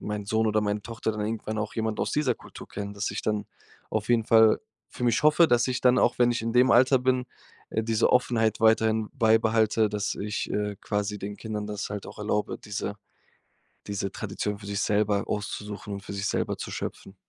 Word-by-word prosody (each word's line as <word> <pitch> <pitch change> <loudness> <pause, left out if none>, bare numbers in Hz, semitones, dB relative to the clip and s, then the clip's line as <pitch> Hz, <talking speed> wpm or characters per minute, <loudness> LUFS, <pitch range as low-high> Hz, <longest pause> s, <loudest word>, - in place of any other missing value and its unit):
mein 105 -1 -4
Sohn 110 +2 +1
oder 110 0 +2
meine 105 0 -1
Tochter 115 0 -3
dann 105 - -5
irgendwann 110 0 -3
auch 105 0 -3
jemand 110 -1 -2
aus - - -1
dieser 145 -5 +1
Kultur - - -12
kennen, 100 0 -6
dass 100 +1 -2
ich - - -3
dann 105 -1 -1 0.5
auf 110 -1 -2
jeden 120 -2 +3
Fall 110 -1 +5 0.3
für 125 - -5
mich 120 0 +2
hoffe, 155 +3 +6
dass 120 +1 +3
ich 125 -1 -1
dann 125 0 +5
auch, 120 - +2
wenn 120 -1 +5
ich 120 - -2
in 115 0 -2
dem 125 +2 +5
Alter 130 +2 +5
bin, 125 0 +1 0.4
äh, 110 - 0
diese 115 0 +2
Offenheit 115 -3 +2
weiterhin 110 -1 +3
beibehalte, 110 -2 +3
dass 105 0 -2
ich, 105 +1 -3
äh, 105 -1 -2
quasi 105 0 -2
den 100 +1 -6
Kindern 105 -2 -5
das 105 -1 -4
halt 105 -1 -5
auch - - -11
erlaube, 105 0 -1
diese 105 0 -4 0.9
diese 100 -1 -3
Tradition 105 0 -4
für 100 - -11
sich 100 0 -2
selber 105 -2 +1
auszusuchen 105 0 -4
und 100 - -7
für - - -8
sich 100 0 -3
selber - - -1
zu - - -6
schöpfen. 95 - -6
110 Hz, 210 wpm, -27 LUFS, 105-115 Hz, 0.9 s, hoffe